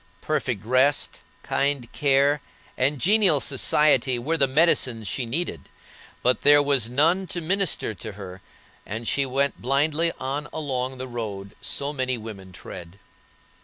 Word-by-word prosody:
Perfect 125 -9 -2
rest, 130 +4 +2 0.2
kind 140 -4 -1
care, 140 0 +2 0.3
and 140 +3 +1
genial 190 - +4
society 135 -2 +3
were 145 +8 -1
the 140 -4 +3
medicines 130 -6 +2
she 125 +5 -3
needed, 130 - -4 0.5
but 125 +1 +2
there 145 0 +6
was 135 -5 +1
no 140 +5 +3
one 185 +2 -2
to 175 - -4
minister 180 - 0
to 105 - -8
her, 95 -2 -10 0.4
and 110 +2 -6
she 140 -1 +1
went 140 +2 -1
blindly 150 +5 +1
on 140 +3 -3
along 130 -4 -3
the 130 +1 -6
road 105 -5 -6
so 140 +1 -2
many 130 -2 -1
women 105 -4 -9
tread. 90 0 -10
135 Hz, 145 wpm, -24 LUFS, 120-150 Hz, 0.5 s, there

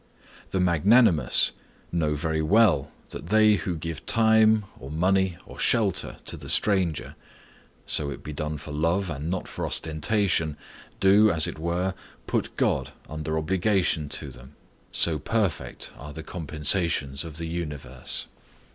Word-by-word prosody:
The 95 - -1
magnanimous 90 +2 +4 0.4
know 80 -3 0
very 80 +1 -1
well 105 +6 +3 0.2
that - - -8
they 110 0 +5
who 90 0 -3
give 80 -1 -6
time, 110 -1 +4
or 65 - -9
money, 95 +3 +1
or - - -12
shelter, - - +1
to - - -5
the - - -9
stranger,—so 85 -5 -2
it 70 - -8
be 75 - -6
done 75 0 -3
for 75 +1 -9
love 85 +5 0
and 75 +2 -4
not 95 0 -3
for - - -6
ostentation,—do, 95 +3 +1
as 80 -5 +2
it - - -5
were, 85 +3 -1 0.3
put - - -2
God - - 0
under 80 +1 -3
obligation 90 -2 +1
to 75 0 -3
them, 65 +2 -14 0.4
so 80 -3 +2
perfect 105 +3 -2
are 75 +2 -10
the 80 - -7
compensations 75 -3 0
of 80 -3 -7
the 85 - -4
universe. 75 -7 -4
85 Hz, 140 wpm, -26 LUFS, 75-95 Hz, 0.4 s, they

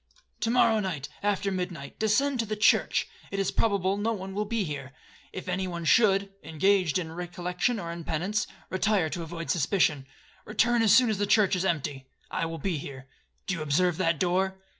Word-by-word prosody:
To 225 - 0
morrow 235 -2 +4
night, 165 -9 -3
after 200 -1 0
midnight, 180 -6 -5
descend 250 +5 +2
to 230 - +1
the 215 - -2
church, 210 - +3 0.2
it 195 - -4
is 195 -1 0
probable 200 -3 +1
no 220 +3 0
one 190 -2 -6
will 210 +2 -1
then - - -13
be 215 - +2
here. 140 -5 -6 0.4
If 185 - -7
any 185 +1 -1
one 170 -2 -5
should, 195 -1 +4
(engaged 185 +1 +2
in 165 -3 -4
recollection 180 +6 -2
or 170 -4 -5
in 170 0 -6
penance), 190 +7 -1 0.2
retire 190 -4 +1
to 175 - -4
avoid 165 0 -4
suspicion. 155 -4 +1 0.4
Return 240 0 +2
as 220 -3 +4
soon 240 -1 +5
as 205 - -2
the 205 - +1
church 205 -2 +4
is 180 +1 -1
empty,—I 145 -1 -3
will 165 0 -5
be 175 -4 -2
here. 135 -1 -9 0.4
Do 195 - -1
you 165 - -4
observe 160 +3 +1
that 165 -3 +1
door?' 190 +1 +1
185 Hz, 195 wpm, -27 LUFS, 165-205 Hz, 0.4 s, soon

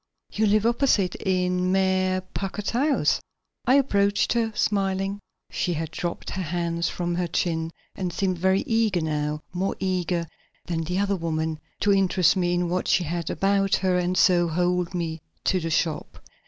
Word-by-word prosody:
"You 220 +1 +1
live 210 +1 +3
opposite; 235 -6 +2
in 180 -1 0
Mayor 185 -1 +2
Packard's 200 +1 -3
house?" 280 +5 +2 0.5
I 255 - +6
approached 205 -7 +2
her, 230 -2 0
smiling. 195 -1 0 0.3
She 175 - -1
had 160 0 -3
dropped 170 0 -4
her 190 - -3
hands 170 0 -1
from 175 -1 -2
her 175 0 -1
chin 165 -1 -1 0.3
and 180 -2 -3
seemed 185 0 -1
very 190 +2 +3
eager 220 -6 +1
now, 150 -1 -2
more 190 +2 -1
eager 180 -2 -1 0.4
than 165 -2 -2
the 180 +3 -2
other 200 0 +1
woman, 160 -2 -2 0.2
to 205 0 +4
interest 190 -2 +3
me 175 -1 +1
in 175 0 0
what 180 +1 -1
she 180 - +3
had 170 0 -3
about 195 +2 +2
her 185 -1 +1
and 180 +1 0
so 175 -2 +4
hold 180 +2 0
me 165 -2 -3 0.2
to 185 - +2
the 165 -1 -3
shop. 160 0 -1
180 Hz, 170 wpm, -25 LUFS, 170-195 Hz, 0.5 s, I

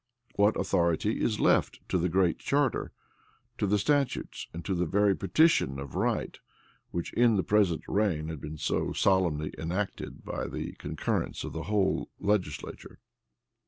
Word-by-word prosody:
What 105 +1 +3
authority 85 +6 +1
is 105 -2 0
left - - +2
to 90 - +1
the 90 +2 +1
Great 90 -1 +2
Charter, 140 -1 0 0.7
to 105 - +1
the 105 +2 +3
statutes, 140 +4 0
and 85 +1 -8
to 100 - 0
the 90 -1 0
very 100 +3 +3
petition 95 - +3
of 70 0 -7
right, - - -1 0.5
which 85 - -4
in 120 -2 +4
the 95 - +1
present 100 -6 +2
reign 95 -7 0
had 80 -4 -6
been 75 +1 -6
so - - -1
solemnly 85 -6 +1
enacted 90 +5 -4
by - - -3
the - - -5
concurrence - - -2
of - - -6
the 80 0 -5
whole 100 -3 +1
legislature? 105 -2 -2
95 Hz, 155 wpm, -29 LUFS, 85-105 Hz, 0.7 s, in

